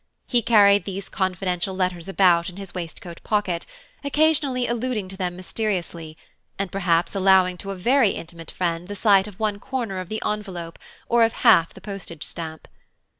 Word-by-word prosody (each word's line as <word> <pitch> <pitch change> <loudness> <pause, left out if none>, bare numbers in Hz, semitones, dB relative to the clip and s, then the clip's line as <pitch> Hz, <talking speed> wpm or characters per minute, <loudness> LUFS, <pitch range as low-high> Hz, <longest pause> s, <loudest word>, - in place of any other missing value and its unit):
He 240 -2 +2
carried 205 -3 +5
these 195 0 -5
confidential 185 -1 -1
letters 185 -1 -2
about 180 -3 +3
in 180 - -12
his 195 -2 -8
waistcoat 170 -1 -7
pocket, 195 -5 -1 0.4
occasionally 285 -3 +2
alluding 235 -4 -2
to 190 - -8
them 180 -2 -3
mysteriously, 175 -4 -4 0.4
and 195 -2 -3
perhaps 175 -3 +1
allowing 190 -2 +4
to 195 - -8
a 195 - -3
very 235 +5 +3
intimate 165 -2 -7
friend 170 -1 -2
the 205 - -6
sight 200 -1 +4
of 200 -3 -12
one 210 -2 -1
corner 235 -6 -3
of 185 -1 -7
the 215 - -4
envelope, 185 -6 -4 0.3
or 235 0 +4
of 225 - +2
half 165 0 +6
the - - -12
postage 195 -6 -7
stamp. 160 -2 -6
190 Hz, 170 wpm, -23 LUFS, 175-210 Hz, 0.4 s, half